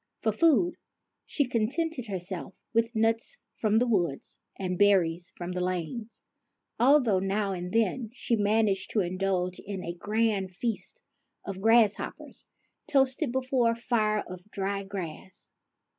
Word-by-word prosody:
For 220 - +3
food 330 - +3 0.5
she 285 -4 0
contented 255 +3 -1
herself 185 -2 -5 0.2
with 230 +1 +1
nuts 225 - +1 0.2
from 215 -1 +2
the 245 - +4
wood 175 - +1 0.3
and 185 -2 -2
berries 175 -4 +3
from 175 0 -5
the 180 0 -2
lanes, 185 +6 -4 0.6
although 245 -6 +5
now 195 +1 0
and 180 -1 -4
then 225 +1 +1
she 240 -1 -1
managed 205 -2 +1
to 215 - +3
indulge 185 0 -1
in 195 -2 -6
a 170 - -3
grand 205 -1 0
feast 230 +2 -4 0.4
of 195 -1 -5
grasshoppers, 225 -1 +2 0.4
toasted 270 0 +2
before 255 -2 +1
a - - -6
fire 215 -3 +1
of 180 +2 -10
dried 195 -1 -3
grass. 185 -1 -7
210 Hz, 135 wpm, -28 LUFS, 185-235 Hz, 0.6 s, although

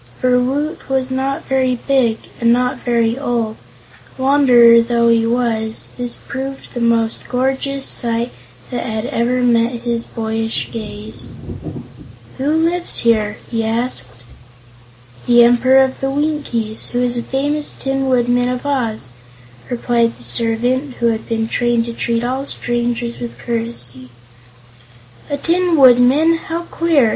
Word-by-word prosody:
For 250 -1 +3
Woot 285 +7 -2
was 265 -1 0
not 265 +1 -2
very 260 -1 +1
big 245 -3 +1 0.2
and 235 0 +3
not 250 +1 +1
very 235 0 0
old 235 -5 -1
and, - - -25
wanderer 245 -4 +6
though 235 0 +2
he 230 -1 +3
was, 230 -2 -1
this 245 -1 -1
proved 270 0 -7
the 240 - -4
most 230 -1 0
gorgeous 270 +2 -1
sight 235 0 +1 0.4
that 245 - -2
had 220 -1 -3
ever 250 +1 0
met 235 0 +1
his 235 -1 -1
boyish 225 0 -3
gaze. 215 -1 -6 1.1
"Who 270 - -1
lives 330 +3 +3
here?" 215 -2 +2
he 225 -1 -1
asked. 220 - -2 1.0
"The 240 0 +7
Emperor 255 +3 +5
of 265 0 -3
the 270 - 0
Winkies, 275 -7 -2
who 245 - -2
is 245 -1 +1
the 240 - -1
famous 290 +4 -1
Tin 270 0 -2
Woodman 245 0 +2
of 250 +2 -4
Oz," 230 - -1 0.6
replied 235 -1 0
the - - -8
servant, 240 - 0
who 235 - +1
had 225 -1 -3
been 225 -1 -1
trained 240 0 +1
to 235 - -5
treat 230 0 -1
all 260 +3 -2
strangers 240 0 -2
with 240 - -7
courtesy. 225 - -3 1.2
"A 285 - -1
Tin 345 +3 +1
Woodman? 265 +5 +5
How 330 +1 -5
queer!" 320 -8 +3
245 Hz, 140 wpm, -17 LUFS, 230-265 Hz, 1.2 s, The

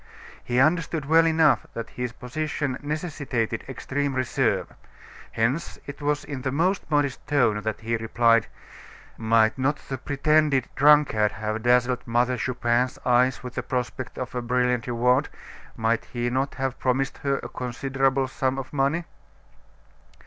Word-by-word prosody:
He 120 - -2
understood 155 +1 +2
well 165 +3 +5
enough 160 -6 +3
that 115 - -5
his 125 -1 -4
position 145 +2 -3
necessitated 145 -7 -3
extreme 140 +1 -2
reserve; 130 -1 0 0.6
hence, 125 +9 -1
it 145 +1 -9
was 145 0 0
in 140 -3 -6
the 130 - -2
most 175 +5 0
modest 145 -3 0
tone 120 -8 +2
that 110 0 -3
he 115 +1 -1
replied: 115 0 +2 0.7
"Might 110 +2 +2
not 140 +3 +2
the 135 -2 -3
pretended 145 0 +2
drunkard 145 -7 +4
have 110 0 -3
dazzled 125 +1 +2
Mother 120 +2 +2
Chupin's 125 +1 0
eyes 125 +1 +3
with 125 -1 -7
the - - -2
prospect 125 0 -4
of 130 0 -5
a 125 - -2
brilliant 125 -1 0
reward? 125 +4 +2 0.5
Might 115 +1 0
he 120 0 -3
not 135 +2 -1
have 135 -1 -3
promised 130 +1 0
her 140 -1 0
a - - -6
considerable 135 +2 -1
sum 130 0 -1
of 135 +1 -6
money?" 145 +5 +1
130 Hz, 145 wpm, -25 LUFS, 120-145 Hz, 0.7 s, well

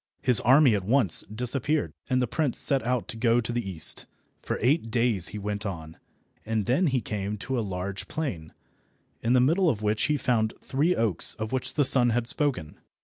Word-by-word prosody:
His 125 -4 +5
army 130 +1 +4
at 100 -3 -1
once 115 -3 +4
disappeared, 125 - -2 0.2
and 130 0 +1
the - - -1
prince 145 0 -2
set 135 -2 +2
out 125 +1 -2
to 115 - -4
go 115 +1 +2
to 120 0 -3
the 120 0 -2
east. 80 -5 +1 0.3
For - - -4
eight 125 0 0
days 115 -5 +1
he 105 - -7
went 105 0 -4
on, 80 -6 -7 0.5
and 110 -2 -2
then 140 +9 +1
he 130 -3 0
came 105 0 -5
to 130 +5 -4
a - - 0
large 95 -1 -5
plain, 100 - -5 0.7
in 115 +2 0
the 130 - +4
middle 165 +8 +2
of 110 -7 -3
which 105 +1 0
he 150 0 0
found 110 -5 -1
the - - -25
three 155 +7 0
oaks 110 -7 +4
of 110 0 -6
which 130 -1 -3
the 145 - +2
sun 130 -2 +3
had 120 0 -1
spoken. 125 - -2
120 Hz, 205 wpm, -26 LUFS, 105-130 Hz, 0.7 s, His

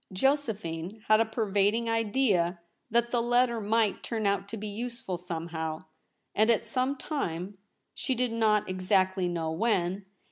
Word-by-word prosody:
Josephine 210 - -1
had 215 0 +7
a 225 - +4
pervading 220 0 +1
idea 210 -6 +1 0.3
that 235 +1 +2
the 240 - +2
letter 240 -1 +2
might 215 0 +1
turn 225 -3 -3
out 200 0 +1
to 225 - -6
be 215 +1 -5
useful 235 -2 -4
somehow, 165 -2 -4 0.5
and 215 +2 +3
at 230 - +3
some 260 +2 0
time; 190 - -4 0.3
she 260 - -1
did 250 0 0
not 220 -2 +2
exactly 185 0 +1
know 165 -2 -2
when. 190 0 0
210 Hz, 145 wpm, -29 LUFS, 185-235 Hz, 0.5 s, had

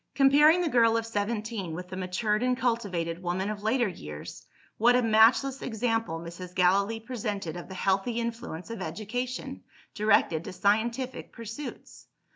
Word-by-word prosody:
Comparing 295 +5 +6
the 350 - +1
girl 230 -5 +4
of 225 - -2
seventeen 210 -4 -3
with 180 +1 -6
the 185 - -6
matured 200 +4 -1
and 250 0 +1
cultivated 190 -9 -1
woman 185 +3 -1
of 205 -1 -6
later 230 +3 +2
years, 75 - -8 0.3
what 240 +3 +5
a 250 - +4
matchless 230 +5 +4
example 225 -6 -1
Mrs. 175 +2 -9
Gallilee 200 +5 +3
presented 210 -8 -4
of 175 - -7
the 190 - -8
healthy 195 +5 +1
influence 230 -6 -5
of 230 -4 -6
education, 220 +9 -4 0.3
directed 205 -6 +2
to - - -6
scientific 235 +6 0
pursuits! 230 +5 -9
220 Hz, 150 wpm, -28 LUFS, 185-235 Hz, 0.3 s, Comparing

